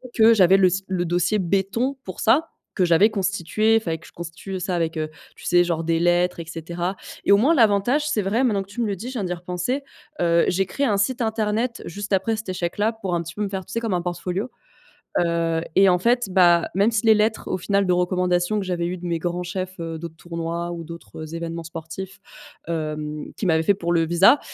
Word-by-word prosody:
que 225 0 +7
j'avais 190 -3 +6
le 190 -1 +5
s 190 +2 -1
le 185 -2 -1
dossier 175 +5 +1
béton 195 +9 0
pour 185 - -7
ça, 285 +9 +3 0.3
que 185 - +3
j'avais 175 +5 +5
constitué. 200 +2 +1
Il - - +5
fallait 165 -6 -2
que 170 - -17
je - - -16
constitue 170 +3 -8
le 190 - -2
ça 180 0 -2
avec, 165 -1 -1
heu, 155 0 -2 0.3
tu - - -14
sais, 175 0 +4
genre 170 -2 -1
des 165 0 +1
lettres 175 +1 +2
et 170 - -5
cetera. 170 +3 -4 0.3
Et - - +3
au 200 - +8
moins 275 +11 +4
l'avantage, 240 +5 +3
c'est 225 -8 +1
vrai 215 +7 +1
maintenant 210 -6 +1
que - - -21
tu 205 +4 -4
me - - +1
le 200 - -1
dis, 220 +7 -8
je 260 - -5
viens 230 -6 -2
d'y 180 - -2
repenser, 180 +10 -3 0.4
heu, 170 -1 +4
j'ai 190 +2 +1
créé 280 +9 -1
un 205 -3 +2
site 240 +6 0
internet 220 +1 -1
juste 205 +3 -5
après 195 +4 +1
cet 215 -2 -6
échec-là, 185 +4 -1
pour 195 -5 -3
un 170 - -1
petit 170 +1 -9
peu 210 - -2
me 200 - -2
faire, 190 -1 -4
tu - - -13
sais, 230 - 0
comme 225 -4 -1
un 175 - 0
portfolio. 180 +5 -3 0.7
Heu, 170 -1 +1 0.2
et 195 0 +7
en 180 -1 +4
fait, 240 +3 +2
bah, 175 -2 +5
même 200 +4 +3
si 225 0 -1
les 220 - +7
lettres 215 +1 +1
au - - 0
final 200 +2 +1
de 180 - +2
recommandation 180 +2 +1
que - - -4
j'avais 175 -2 -2
eues 180 - -3
de 175 - -7
mes 170 -1 -1
grands 175 +1 -2
chefs, 185 +1 -5
heu, 165 -1 -4
d'autres 165 0 -8
tournois 170 +1 -4
ou 170 -1 -5
d'autres, 170 +1 -11
heu, 155 +1 -8
événements 165 0 -5
sportifs, 165 +4 -7 0.5
hem, 155 -2 -4
qu'ils 205 - -3
m'avaient 160 -1 +3
fait 200 - +4
pour 170 -3 -2
le 165 -1 +3
visa, 175 - +5
180 Hz, 245 wpm, -23 LUFS, 170-210 Hz, 0.7 s, au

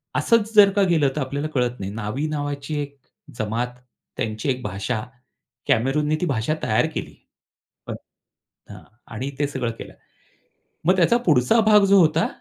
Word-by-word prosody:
असंच 225 -2 +2
जर 205 -2 +8
का 200 - +3
गेलं 155 -5 +3
तर 150 - -1
आपल्याला 140 +3 -3
कळत 125 -1 0
नाही. 95 0 -5
नावी 115 +7 -3
नावाची 145 -1 -4
एक 140 -1 -8 0.4
जमात 115 +3 -2 0.4
त्यांची 110 +4 -3
एक 125 -1 -1
भाषा 110 +4 -3 0.6
कॅमेरूने 150 +6 +1
ती - - +1
भाषा 130 -2 0
तयार - - +2
केली. - - -6 0.7
हं, - - -3 0.8
अ, - - -11 0.3
आणि 130 +5 -4
ते 145 - +1
सगळं 130 -4 -3
केलं. - - -9 0.9
मग 185 - +4
त्याचा 185 +7 +4
पुढचा 145 - +4
भाग 210 -2 +6
जो 195 0 +5
होता 160 -1 +3
140 Hz, 155 wpm, -22 LUFS, 125-160 Hz, 0.9 s, जर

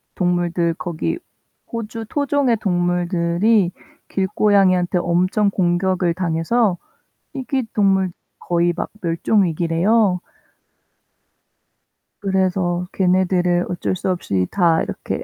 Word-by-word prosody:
동물들 175 -1 0
거기 175 - -3 0.5
호주 225 0 -5
토종의 285 -4 +1
동물들이 175 +1 +1 0.4
길고양이한테 190 -2 +2
엄청 180 +4 +1
공격을 180 -1 +1
당해서 180 +4 0 0.6
희귀 265 -1 -2
동물 190 -3 +2 0.3
거의 175 0 +1
막 - - -3
멸종 175 +5 +1
위기래요. 180 +4 +1 2.0
그래서 185 -3 0
걔네들을 180 -1 +2
어쩔 180 +1 -2
수 185 - -3
없이 95 - -1
다 170 -4 +3
이렇게 - - -5
180 Hz, 225 characters per minute, -20 LUFS, 175-200 Hz, 2.0 s, 다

